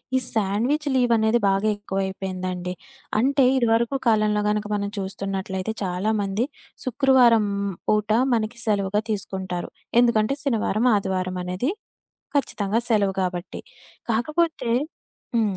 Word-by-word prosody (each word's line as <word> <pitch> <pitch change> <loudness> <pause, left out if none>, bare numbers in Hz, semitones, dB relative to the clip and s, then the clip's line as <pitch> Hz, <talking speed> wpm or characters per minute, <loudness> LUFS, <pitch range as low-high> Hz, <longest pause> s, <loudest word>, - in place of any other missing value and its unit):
ఈ - - +5 0.2
sandwich 230 +9 0
leave 245 -2 +3
అనేది 220 +2 +3
బాగా 195 +2 +1
ఎక్కువైపోయిందండి. 190 -2 -3 0.5
అంటే, 270 +2 +3
ఇదివరకు 235 +2 +2
కాలంలో 215 -1 +3
గనక 210 0 0
మనం 200 0 -2
చూస్తున్నట్లయితే, 195 +1 -3
చాలామంది 200 +4 0 0.4
శుక్రవారం 250 -3 +4 0.4
పూట 210 0 +2 0.2
మనకి 225 +1 -1
సెలవుగా 205 -1 +1
తీసుకుంటారు. 190 -3 -4 0.3
ఎందుకంటే, 235 +1 +2
శనివారం 230 -2 +1
ఆదివారం 185 -2 -1
అనేది 185 - -1 0.7
ఖచ్చితంగా 210 -6 0
సెలవు 205 -4 +2
గాబట్టి. 180 0 -3 0.5
కాకపోతే 305 +3 0 0.7
హ్మ్. 210 -4 +1
210 Hz, 105 wpm, -24 LUFS, 195-235 Hz, 0.7 s, ఈ